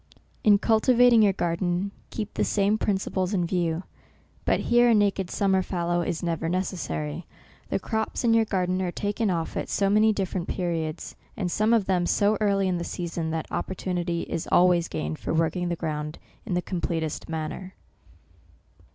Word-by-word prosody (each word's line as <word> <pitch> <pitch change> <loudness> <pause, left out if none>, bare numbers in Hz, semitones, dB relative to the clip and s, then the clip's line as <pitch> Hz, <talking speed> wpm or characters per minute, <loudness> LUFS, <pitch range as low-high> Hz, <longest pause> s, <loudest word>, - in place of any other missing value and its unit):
In 205 -2 +6
cultivating 235 +2 +5
your 205 -2 +5
garden, 175 +2 -1 0.2
keep 210 -2 -5
the - - 0
same 205 +1 +1
principles 190 -1 -1
in 175 -2 +1
view; 170 -1 -1 0.6
but - - +2
here 240 0 +4
a 230 - +5
naked 200 -3 +1
sum 200 0 +1
mer 190 0 +3
fallow 175 -1 -1
is 170 -1 -3
never 165 -1 -1
necessary. 120 - -3 0.4
The - - +1
crops 220 +2 -2
in 230 -1 +4
your 225 -1 +4
garden 185 -2 0
are 180 -2 -1
taken 205 +3 -1
off 165 -3 -2
at - - -3
so 200 -1 +1
many 215 +1 +5
dif 195 -3 -2
ferent 180 -2 -2
periods, 165 -4 -3 0.2
and 180 -4 -2
some 215 +5 +2
of 225 -4 +3
them 180 -2 +1
so 205 +1 +3
early 200 -2 +2
in 180 -2 0
the - - -3
season, 170 -2 -4
that 160 -1 -2
opportunity 175 -2 -2
is 165 - -4
always 175 -1 +4
gained 75 +1 -4
for - - -2
working 175 +2 0
the 170 - -1
ground 150 -1 -4 0.3
in 185 - -1
the 180 - 0
completest 165 -4 -3
manner. 160 +4 -5
185 Hz, 175 wpm, -26 LUFS, 170-205 Hz, 0.6 s, In